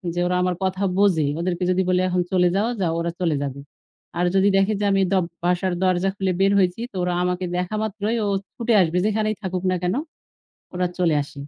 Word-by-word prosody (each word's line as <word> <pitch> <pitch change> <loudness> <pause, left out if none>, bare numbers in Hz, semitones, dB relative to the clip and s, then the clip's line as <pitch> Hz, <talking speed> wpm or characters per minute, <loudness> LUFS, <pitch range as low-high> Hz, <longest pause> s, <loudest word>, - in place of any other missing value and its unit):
যে - - -1
ওরা 180 - 0
আমার 180 -1 0
কথা 190 +1 -1
বোঝে। 180 -8 +3
ওদেরকে 175 +1 -2
যদি 185 +1 +2
বলি 180 0 +3
এখন 180 0 +1
চলে 180 -1 +3
যাও, 210 +3 +1
যাও, 165 -2 +1
ওরা 170 0 -2
চলে 165 -4 +1
যাবে। 140 0 -5 0.6
আর 180 - +2
যদি 195 +1 +4
দেখে 195 +2 +2
যে 205 - 0
আমি 195 0 +3
দ - - +2 0.3
বাসার 180 +1 +1
দরজা 185 +1 +2
খুলে 190 -2 -1
বের 195 +1 +4
হয়েছি 185 +4 +1
তো - - -18
ওরা 180 0 0
আমাকে 180 0 -1
দেখা 180 +4 -2
মাত্রই 215 +2 -2
ও - - 0 0.3
ছুটে 235 -1 0
আসবে। 170 0 +1
যেখানেই 215 0 0
থাকুক 185 -1 -3
না - - +1
কেনো? 185 +10 0 0.7
ওরা 180 0 0
চলে 165 -4 +2
আসে। - - -14
185 Hz, 215 wpm, -22 LUFS, 180-195 Hz, 0.7 s, যদি